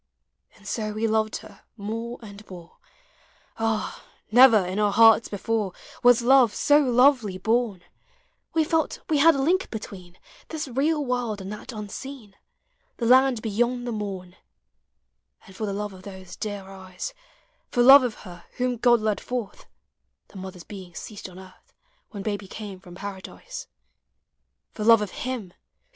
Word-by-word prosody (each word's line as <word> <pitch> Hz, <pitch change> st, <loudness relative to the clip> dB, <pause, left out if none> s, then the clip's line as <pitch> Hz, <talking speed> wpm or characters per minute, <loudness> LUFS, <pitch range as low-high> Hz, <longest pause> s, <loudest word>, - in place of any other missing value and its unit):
And -, -, -16 dB
so 215 Hz, -2 st, -3 dB
we 215 Hz, +2 st, -1 dB
loved 220 Hz, 0 st, 0 dB
her -, -, -15 dB, 0.2 s
more 230 Hz, +3 st, -5 dB
and 205 Hz, -1 st, -11 dB
more: 175 Hz, -2 st, -12 dB, 0.8 s
Ah, 225 Hz, -1 st, -2 dB, 0.3 s
never 230 Hz, -4 st, +7 dB
in 185 Hz, +3 st, -3 dB
our 210 Hz, -1 st, +2 dB
hearts 225 Hz, +1 st, +6 dB
before 205 Hz, -1 st, -2 dB, 0.3 s
Was 245 Hz, -1 st, +5 dB
love 250 Hz, -4 st, +5 dB
so 290 Hz, 0 st, +4 dB
lovely 250 Hz, -6 st, +3 dB
born: 220 Hz, -2 st, 0 dB, 0.7 s
We 320 Hz, -, +4 dB
felt 320 Hz, 0 st, -1 dB
we 305 Hz, -2 st, +2 dB
had 325 Hz, +2 st, +6 dB
a 275 Hz, -, 0 dB
link 365 Hz, +6 st, +1 dB
between 185 Hz, -5 st, -9 dB, 0.3 s
This 310 Hz, -2 st, -5 dB
real 290 Hz, +4 st, 0 dB
world 245 Hz, -4 st, -2 dB
and 195 Hz, +2 st, -6 dB
that 210 Hz, -, -9 dB
unseen— 215 Hz, +1 st, -8 dB, 0.6 s
The 235 Hz, -, -2 dB
land 255 Hz, -1 st, +4 dB
beyond 240 Hz, +3 st, 0 dB
the 240 Hz, -, -3 dB
morn; 195 Hz, -4 st, -6 dB, 1.1 s
And 190 Hz, -, -15 dB
for 215 Hz, +2 st, -3 dB
the -, -, -2 dB
love 205 Hz, 0 st, -4 dB
of 185 Hz, -, -12 dB
those 190 Hz, -2 st, -10 dB
dear 205 Hz, -2 st, -5 dB
eyes, 190 Hz, -, -8 dB, 0.6 s
For 240 Hz, -, +2 dB
love 275 Hz, +3 st, +10 dB
of 245 Hz, -4 st, -2 dB
her 175 Hz, -2 st, -11 dB
whom 250 Hz, -1 st, 0 dB
God 240 Hz, 0 st, +4 dB
led 215 Hz, -1 st, -1 dB
forth 240 Hz, -5 st, -5 dB, 0.6 s
(The -, -, -13 dB
mother's 185 Hz, -2 st, -8 dB
being 185 Hz, -3 st, -11 dB
ceased 205 Hz, -3 st, -8 dB
on 180 Hz, -, -14 dB
earth 185 Hz, 0 st, -16 dB, 0.3 s
When 200 Hz, -4 st, -7 dB
Baby 205 Hz, -2 st, -3 dB
came 200 Hz, -1 st, -8 dB
from 175 Hz, -2 st, -13 dB
Paradise) 200 Hz, -, -8 dB, 0.5 s
— -, -, -54 dB
For 215 Hz, -, -5 dB
love 225 Hz, -1 st, +6 dB
of 200 Hz, -, -6 dB
Uim 245 Hz, -8 st, -5 dB
who -, -, -29 dB
215 Hz, 160 wpm, -25 LUFS, 195-245 Hz, 1.1 s, love